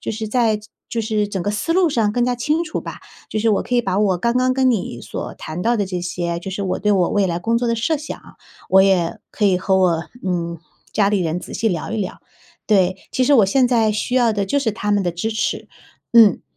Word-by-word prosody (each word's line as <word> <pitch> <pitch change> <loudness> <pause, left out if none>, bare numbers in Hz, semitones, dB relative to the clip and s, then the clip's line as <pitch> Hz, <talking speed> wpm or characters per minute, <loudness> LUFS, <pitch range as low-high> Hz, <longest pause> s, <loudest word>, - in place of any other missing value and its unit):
就 - - -4
是 220 0 -4
在 220 -1 +1 0.3
就 230 - -2
是 215 -2 -1
整 195 -2 -3
个 205 - -2
思 210 +11 -1
路 365 -1 +3
上 225 -7 +1
更 240 +1 +1
加 250 0 0
清 300 +7 0
楚 315 - -4
吧， - - -7 0.4
就 215 - -2
是 225 +1 +1
我 205 - +1
可 245 - -1
以 - - +4
把 195 -5 -2
我 190 -4 +2
刚 235 +6 0
刚 255 0 +2
跟 260 0 +2
你 220 -6 -2
所 - - -6
谈 160 +3 -6
到 235 +1 +2
的 205 -3 -1
这 180 -1 -3
些， 175 -1 -3
就 190 - -6
是 195 +2 -4
我 185 - -1
对 210 - +1
我 185 -4 +3
未 205 -2 +2
来 170 0 -1
工 225 +6 0
作 240 0 0
的 230 - +1
设 300 +8 0
想， 295 +2 -7 0.5
我 190 0 +6
也 185 -4 +2
可 210 - -2
以 190 -3 +4
和 190 +1 +1
我， 175 -3 +2 0.2
嗯， 170 -2 -2 0.3
家 200 -2 +2
里 205 -2 +1
人 165 0 -1
仔 - - -9
细 225 - +1
聊 175 +1 -3
一 225 - -2
聊。 185 - -4 0.5
对， 190 -3 +3 0.2
其 260 - +1
实 270 - +3
我 215 -6 +5
现 250 +5 +3
在 225 -3 +2
需 230 +4 -1
要 240 -3 +3
的 205 -1 -1
就 285 +9 0
是 230 -6 0
他 210 0 -3
们 205 -1 +2
的 175 - -1
支 175 +6 -3
持， 220 -1 -2 0.4
嗯。 225 -5 +6
210 Hz, 275 characters per minute, -20 LUFS, 185-235 Hz, 0.5 s, 我